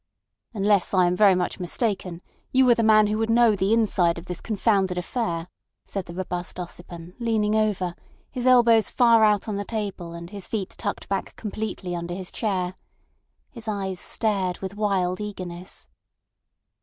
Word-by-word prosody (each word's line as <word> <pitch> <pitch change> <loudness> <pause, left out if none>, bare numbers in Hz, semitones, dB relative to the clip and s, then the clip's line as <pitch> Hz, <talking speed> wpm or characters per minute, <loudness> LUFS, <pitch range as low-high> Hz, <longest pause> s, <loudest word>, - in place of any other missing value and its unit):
"Unless 200 -1 +2
I 185 -1 +5
am 175 +1 +1
very 195 -1 +6
much 180 +1 -2
mistaken, 185 -2 -2 0.3
you 260 0 +4
are - - +9
the 230 - 0
man 215 -1 +6
who 210 +1 -1
would 225 0 0
know 230 -2 +5
the 195 +1 0
inside 195 -7 +3
of 170 - -8
this 180 -2 -6
confounded 195 -4 +1
affair," 180 -3 -2 0.4
said 195 -3 -5
the 170 - -8
robust 180 -1 -4
Ossipon, 175 0 -8
leaning 220 -3 +1
over, 205 -5 +1 0.4
his 255 -1 -2
elbows 235 -4 +5
far 230 -2 +5
out 210 -1 +3
on 210 -2 -2
the 205 - -2
table 200 -6 -4
and 170 +1 -8
his 200 -4 -7
feet 205 -4 -3
tucked 205 - -4
back 195 -1 -3
completely 210 -4 -4
under 170 0 -4
his 185 -1 -6
chair. 185 -4 -1 0.8
His 230 -4 -9
eyes 195 -3 -3
stared 195 -5 -1
with 190 0 -6
wild 195 -3 0
eagerness. 185 -3 -7
200 Hz, 170 wpm, -25 LUFS, 180-220 Hz, 0.8 s, are